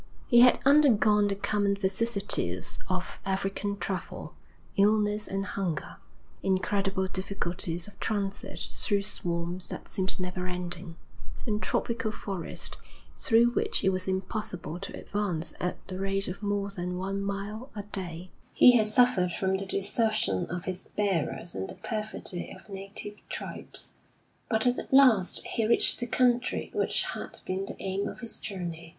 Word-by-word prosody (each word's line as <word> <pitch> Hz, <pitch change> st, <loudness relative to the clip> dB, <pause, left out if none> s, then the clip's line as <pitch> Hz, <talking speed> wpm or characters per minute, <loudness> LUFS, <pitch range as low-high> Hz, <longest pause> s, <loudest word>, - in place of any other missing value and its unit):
He 240 Hz, -, +5 dB
had 250 Hz, +1 st, +8 dB
undergone 220 Hz, -8 st, +5 dB
the 200 Hz, -, 0 dB
common 200 Hz, 0 st, +1 dB
vicissitudes 195 Hz, -, -1 dB
of 185 Hz, -1 st, -3 dB
African 195 Hz, +1 st, -2 dB
travel, 190 Hz, -3 st, -4 dB, 0.4 s
illness 210 Hz, 0 st, +3 dB
and 195 Hz, 0 st, -2 dB
hunger, 185 Hz, -7 st, -3 dB, 0.4 s
incredible 195 Hz, 0 st, +1 dB
difficulties 175 Hz, -2 st, -2 dB
of 205 Hz, -, -15 dB
transit 200 Hz, -2 st, -3 dB
through 200 Hz, -2 st, 0 dB
swamps 175 Hz, -3 st, 0 dB
that -, -, -7 dB
seemed 190 Hz, 0 st, 0 dB
never 180 Hz, 0 st, -3 dB
ending, 180 Hz, -1 st, -4 dB, 0.5 s
and 215 Hz, -3 st, -1 dB
tropical 230 Hz, -1 st, -1 dB
forest 195 Hz, -5 st, -4 dB, 0.4 s
through 235 Hz, +1 st, +4 dB
which 240 Hz, -, 0 dB
it 190 Hz, -, +4 dB
was 185 Hz, 0 st, -1 dB
impossible 190 Hz, -2 st, -3 dB
to 195 Hz, -, -6 dB
advance 195 Hz, -6 st, -2 dB
at 180 Hz, -, -3 dB
the 185 Hz, -1 st, -5 dB
rate 195 Hz, 0 st, 0 dB
of 180 Hz, +3 st, -5 dB
more 205 Hz, -1 st, -1 dB
than 180 Hz, -2 st, -3 dB
one 195 Hz, +2 st, -2 dB
mile 200 Hz, +5 st, -4 dB
a 205 Hz, -, -4 dB
day; 180 Hz, -3 st, -5 dB, 0.2 s
he 250 Hz, -, +8 dB
had 215 Hz, -1 st, +3 dB
suffered 215 Hz, -5 st, +4 dB
from 190 Hz, +2 st, 0 dB
the 195 Hz, 0 st, -5 dB
desertion 200 Hz, -, +1 dB
of 180 Hz, +2 st, -5 dB
his 185 Hz, 0 st, -4 dB
bearers 180 Hz, -4 st, 0 dB
and 95 Hz, -, -4 dB
the -, -, -8 dB
perfidy 215 Hz, -5 st, -4 dB
of -, -, -16 dB
native 200 Hz, +2 st, -6 dB
tribes. -, -, -5 dB, 0.6 s
But 220 Hz, 0 st, +3 dB
at 245 Hz, 0 st, 0 dB
last 250 Hz, -9 st, +5 dB
he 225 Hz, -2 st, 0 dB
reached 235 Hz, -, +8 dB
the 240 Hz, -, -1 dB
country 245 Hz, 0 st, +1 dB
which -, -, +1 dB
had -, -, -4 dB
been 190 Hz, +1 st, -2 dB
the -, -, -6 dB
aim 195 Hz, +1 st, -2 dB
of -, -, -8 dB
his 230 Hz, -2 st, -5 dB
journey. 170 Hz, -4 st, -5 dB
195 Hz, 150 wpm, -29 LUFS, 185-215 Hz, 0.6 s, had